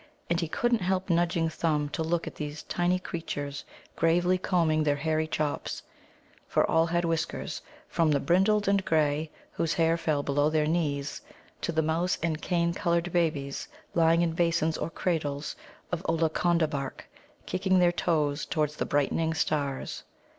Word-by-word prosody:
And 170 Hz, -, +2 dB
he 165 Hz, -, -1 dB
couldn't 240 Hz, +8 st, +1 dB
help 185 Hz, 0 st, 0 dB
nudging 170 Hz, -1 st, +2 dB
Thumb 155 Hz, -2 st, 0 dB
to 165 Hz, -, -3 dB
look 165 Hz, +1 st, 0 dB
at -, -, -6 dB
these 150 Hz, 0 st, -6 dB
tiny 175 Hz, +1 st, +1 dB
creatures 145 Hz, -6 st, -5 dB, 0.3 s
gravely 175 Hz, +2 st, +2 dB
combing 165 Hz, -4 st, +2 dB
their 145 Hz, -1 st, +2 dB
hairy 155 Hz, +1 st, 0 dB
chops 150 Hz, -2 st, -2 dB, 0.6 s
for -, -, +2 dB
all 165 Hz, +1 st, +3 dB
had 170 Hz, +1 st, 0 dB
whiskers, 165 Hz, -1 st, -2 dB, 0.3 s
from 165 Hz, -2 st, +2 dB
the 145 Hz, -2 st, +3 dB
brindled 195 Hz, +8 st, +3 dB
and 200 Hz, -1 st, +3 dB
grey, 155 Hz, -1 st, +1 dB, 0.2 s
whose 165 Hz, -1 st, -1 dB
hair 165 Hz, 0 st, +3 dB
fell 155 Hz, -3 st, 0 dB
below 145 Hz, +1 st, +2 dB
their 155 Hz, -1 st, +2 dB
knees, 150 Hz, -3 st, -1 dB, 0.4 s
to -, -, -1 dB
the 160 Hz, -1 st, +1 dB
mouse 165 Hz, +3 st, +1 dB
and 160 Hz, -2 st, -1 dB
cane 170 Hz, -1 st, +1 dB
coloured 170 Hz, -2 st, 0 dB
babies 155 Hz, -5 st, 0 dB, 0.3 s
lying 165 Hz, 0 st, +4 dB
in 170 Hz, -, +1 dB
basins 165 Hz, -1 st, +1 dB
or -, -, -3 dB
cradles 150 Hz, -5 st, -2 dB, 0.4 s
of 175 Hz, 0 st, -2 dB
Ollaconda 165 Hz, 0 st, +2 dB
bark, 140 Hz, -3 st, -5 dB, 0.4 s
kicking 185 Hz, 0 st, +1 dB
their 175 Hz, -1 st, +5 dB
toes 155 Hz, -4 st, 0 dB
towards 150 Hz, -2 st, -1 dB
the -, -, -2 dB
brightening 160 Hz, +3 st, +1 dB
stars. 145 Hz, -3 st, -1 dB
165 Hz, 160 wpm, -28 LUFS, 150-175 Hz, 0.6 s, their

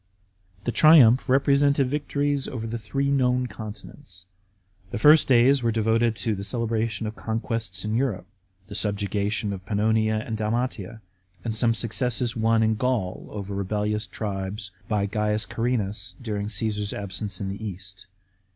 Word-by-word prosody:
The 120 Hz, -, -1 dB
triumph 135 Hz, -4 st, +6 dB
represented 140 Hz, +1 st, +3 dB
victories 145 Hz, 0 st, -1 dB
over 115 Hz, -3 st, -5 dB
the 115 Hz, +1 st, -4 dB
three 135 Hz, +7 st, -1 dB
known 125 Hz, -2 st, +2 dB
continents. 105 Hz, -2 st, -10 dB, 0.6 s
The -, -, -4 dB
first 150 Hz, +7 st, +6 dB
days 130 Hz, +2 st, +5 dB
were 115 Hz, -1 st, +1 dB
devoted 115 Hz, +1 st, +1 dB
to 110 Hz, 0 st, -1 dB
the 100 Hz, -1 st, -5 dB
celebration 115 Hz, 0 st, -1 dB
of 110 Hz, 0 st, -5 dB
conquests 110 Hz, -4 st, -3 dB
in 105 Hz, -, -2 dB
Europe; 115 Hz, -7 st, -1 dB, 0.4 s
the 105 Hz, -, -10 dB
subjugation 100 Hz, 0 st, -1 dB
of 95 Hz, -1 st, -7 dB
Pannonia 110 Hz, +2 st, +1 dB
and 110 Hz, -, -3 dB
Dalmatia, 110 Hz, -1 st, -3 dB, 0.4 s
and 110 Hz, -1 st, -2 dB
some 115 Hz, 0 st, +3 dB
successes 120 Hz, +1 st, +1 dB
won 115 Hz, 0 st, +2 dB
in 110 Hz, 0 st, +1 dB
Gaul 115 Hz, -7 st, -1 dB
over 100 Hz, -1 st, -6 dB
rebellious 105 Hz, +2 st, -2 dB
tribes 95 Hz, -1 st, -5 dB, 0.2 s
by 105 Hz, -2 st, 0 dB
C. 105 Hz, +1 st, -1 dB
Carrinas 105 Hz, -5 st, -2 dB
during 105 Hz, -4 st, -3 dB
Cesar's 105 Hz, -1 st, -2 dB
absence 100 Hz, 0 st, -3 dB
in 95 Hz, -, -3 dB
the 100 Hz, +3 st, -6 dB
East. 95 Hz, -1 st, -8 dB
110 Hz, 145 wpm, -25 LUFS, 105-120 Hz, 0.6 s, triumph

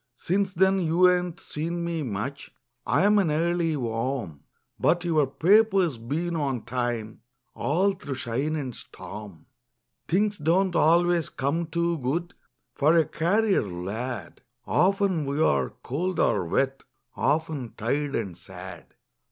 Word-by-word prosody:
Since 190 Hz, +6 st, -1 dB
then 190 Hz, +2 st, +4 dB
you 175 Hz, +1 st, +4 dB
ain't 180 Hz, -1 st, -1 dB
seen 170 Hz, +3 st, -4 dB
me 170 Hz, -2 st, -2 dB
much; 130 Hz, +3 st, -4 dB, 0.4 s
I'm 205 Hz, +9 st, +4 dB
an 185 Hz, -5 st, +2 dB
early 165 Hz, 0 st, +1 dB
worm. 115 Hz, -, -3 dB, 0.4 s
But 175 Hz, +1 st, +2 dB
your 155 Hz, -5 st, +2 dB
paper's 190 Hz, -, +3 dB
been 165 Hz, +9 st, -2 dB
on 135 Hz, -7 st, -1 dB
time 120 Hz, -3 st, -3 dB, 0.3 s
All 190 Hz, +7 st, +1 dB
through 145 Hz, -7 st, -6 dB
shine 130 Hz, +5 st, -2 dB
and 130 Hz, -6 st, -4 dB
storm. 95 Hz, -2 st, -10 dB, 0.6 s
Things 205 Hz, +2 st, +1 dB
don't 175 Hz, +4 st, +2 dB
always 170 Hz, +1 st, +3 dB
come 155 Hz, +5 st, -1 dB
too 170 Hz, 0 st, 0 dB
good 165 Hz, +7 st, -2 dB, 0.4 s
For 150 Hz, +5 st, +3 dB
a 165 Hz, -2 st, +5 dB
carrier 200 Hz, +5 st, +2 dB
lad. 100 Hz, +3 st, -5 dB, 0.2 s
Often 190 Hz, -5 st, +2 dB
we 140 Hz, +2 st, -2 dB
are 70 Hz, -, +2 dB
cold 175 Hz, +8 st, -3 dB
or 90 Hz, -, +2 dB
wet, 135 Hz, +10 st, 0 dB, 0.3 s
Often 150 Hz, -6 st, -1 dB
tired 140 Hz, +6 st, -1 dB
and 100 Hz, -6 st, -3 dB
sad. -, -, -11 dB
155 Hz, 130 wpm, -26 LUFS, 125-175 Hz, 0.6 s, a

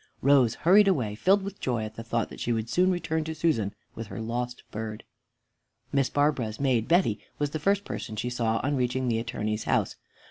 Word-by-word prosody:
Rose 135 Hz, -4 st, +5 dB
hurried 195 Hz, +5 st, +5 dB
away, 125 Hz, -, +1 dB
filled 190 Hz, -, +3 dB
with 200 Hz, 0 st, -7 dB
joy 120 Hz, -4 st, -1 dB
at 110 Hz, 0 st, -6 dB
the -, -, -6 dB
thought 115 Hz, 0 st, -1 dB
that -, -, -10 dB
soon 115 Hz, -2 st, -1 dB
she 175 Hz, -, 0 dB
would -, -, +4 dB
return 160 Hz, -3 st, -1 dB
to 160 Hz, +1 st, -5 dB
Susan 125 Hz, -13 st, +1 dB, 0.2 s
with 115 Hz, -1 st, -7 dB
her 115 Hz, -, -7 dB
lost 120 Hz, +2 st, -3 dB
bird. 110 Hz, 0 st, -5 dB, 0.9 s
Miss 135 Hz, -2 st, +2 dB
Barbara's 140 Hz, -7 st, 0 dB
maid, 125 Hz, -5 st, +1 dB
Betty, 165 Hz, -, +3 dB, 0.2 s
was 145 Hz, -1 st, -1 dB
the 155 Hz, -, -3 dB
first 200 Hz, +5 st, +1 dB
person 110 Hz, -, -5 dB
she 120 Hz, +3 st, -3 dB
saw 115 Hz, -2 st, 0 dB
on 140 Hz, +2 st, +1 dB
reaching 125 Hz, 0 st, 0 dB
the 115 Hz, -1 st, +1 dB
Attorney's 110 Hz, -2 st, -3 dB
house. -, -, 0 dB
125 Hz, 205 wpm, -27 LUFS, 110-155 Hz, 0.9 s, Rose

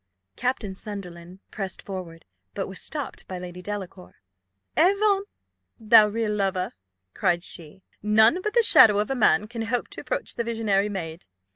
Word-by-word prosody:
Captain 245 Hz, -6 st, -2 dB
Sunderland 185 Hz, -3 st, -9 dB
pressed 195 Hz, -2 st, -4 dB
forward; 180 Hz, -4 st, -8 dB, 0.3 s
but -, -, -3 dB
was 190 Hz, -, -8 dB
stopped 295 Hz, -3 st, -5 dB
by 185 Hz, -, -5 dB
Lady 180 Hz, 0 st, -8 dB
Delacour. 185 Hz, -, -7 dB, 0.6 s
"Avaunt, 395 Hz, +3 st, +3 dB, 0.5 s
thou 220 Hz, -1 st, +7 dB
real 215 Hz, 0 st, -1 dB
lover!" 190 Hz, -2 st, -1 dB, 0.4 s
cried 175 Hz, -2 st, 0 dB
she: 175 Hz, +3 st, -7 dB, 0.2 s
"none 220 Hz, -, +4 dB
but 425 Hz, +4 st, -3 dB
the 475 Hz, -, +5 dB
shadow 210 Hz, -, +7 dB
of 210 Hz, +4 st, 0 dB
a -, -, 0 dB
man 210 Hz, -4 st, +3 dB
can 230 Hz, +1 st, -6 dB
hope 230 Hz, +2 st, -2 dB
to -, -, -8 dB
approach -, -, -3 dB
the 235 Hz, -, -2 dB
visionary 215 Hz, -3 st, 0 dB
maid. 170 Hz, -4 st, -6 dB
205 Hz, 155 wpm, -25 LUFS, 185-235 Hz, 0.6 s, thou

